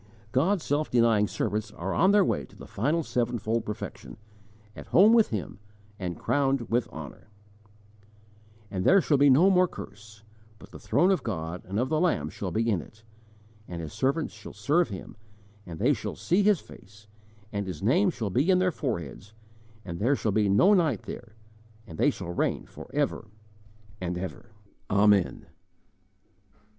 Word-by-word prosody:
God's 165 - +1
self 145 +2 -1
denying 115 -3 +3
servants 105 +4 -2
are 95 +3 -4
on 190 - +4
their 200 -1 +5
way 75 - -1
to - - -20
the - - -11
final 150 +10 -1
sevenfold 115 -3 -1
perfection, 65 -11 -7 0.6
at - - -10
home 210 +5 +6
with 230 -2 +5
Him, 105 -2 -5 0.4
and 90 -3 -4
crowned 135 -2 +1
with 120 +1 +1
honour: 80 - -10 1.4
"And 95 -2 -2
there 195 - +6
shall 155 -5 +2
be 145 0 +6
no 165 +9 +6
more 180 -1 +4
curse; 110 - -11 0.3
But 105 0 -15
the - - -11
throne 165 - +2
of 190 - +1
God 85 -5 -4
and 95 +3 -4
of 125 - 0
the 155 0 +1
Lamb 80 - 0
shall 100 - -5
be 110 +7 -1
in 100 -7 +1
it; 110 +8 -17 0.6
And 85 -1 -6
His 80 -3 -7
servants 140 +4 -1
shall 110 0 -11
serve 145 +11 +1
Him; 95 +1 -9 0.5
And 85 -2 -7
they - - +3
shall - - -5
see 180 +4 +1
His 205 -3 +3
face; 105 +2 -16 0.5
And 100 -1 -3
His 95 +1 -6
name 180 - +3
shall 115 - -4
be 135 - +1
in 185 - +5
their 185 0 +2
foreheads, 105 - -5 0.5
And 85 -3 -6
there 125 +7 +2
shall 110 - -1
be 105 0 +2
no 180 - +5
night 160 - +2
there, 110 -2 -9 0.5
And 80 -8 -11
they - - +4
shall 85 - -5
reign - - -1
for - - -12
ever - - -1 0.7
and 90 -1 -3
ever." 95 +5 -7 0.4
Amen! 100 -2 +3
110 Hz, 170 wpm, -27 LUFS, 95-155 Hz, 1.4 s, home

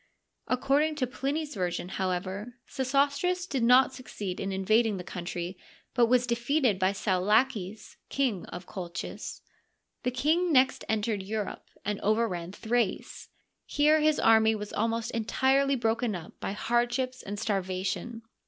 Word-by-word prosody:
According 285 +5 +2
to 280 -4 0
Pliny's 285 +4 -3
version, 180 -2 -2
however, 190 +5 -3
Sesostris.did 280 +4 0
not 250 +3 +5
succeed 205 -7 -6
in 195 - -2
invading 210 +3 +2
the 180 - -6
country, 175 0 -5 0.3
but 240 -2 +4
was 245 +1 +3
defeated 240 -2 +1
by 185 0 +3
Saulaces, 205 +2 0
King 250 -10 0
of 175 +1 -8
Colchis. 180 -1 -6 0.6
The - - 0
king 315 +8 +1
next 265 -2 +4
entered 215 -1 0
Europe, 210 +1 -4 0.2
and 205 0 -1
overran 200 -5 0
Thrace. 225 +1 -2 0.4
Here 305 +2 +4
his 305 0 +3
army 220 0 +5
was 210 -1 -6
almost 225 +1 -1
entirely 265 +5 +2
broken 230 -2 0
up 170 -1 -8
by - - -3
hardships 240 +3 0
and 205 +1 -6
starvation. 195 +3 -2
225 Hz, 130 wpm, -29 LUFS, 195-260 Hz, 0.6 s, not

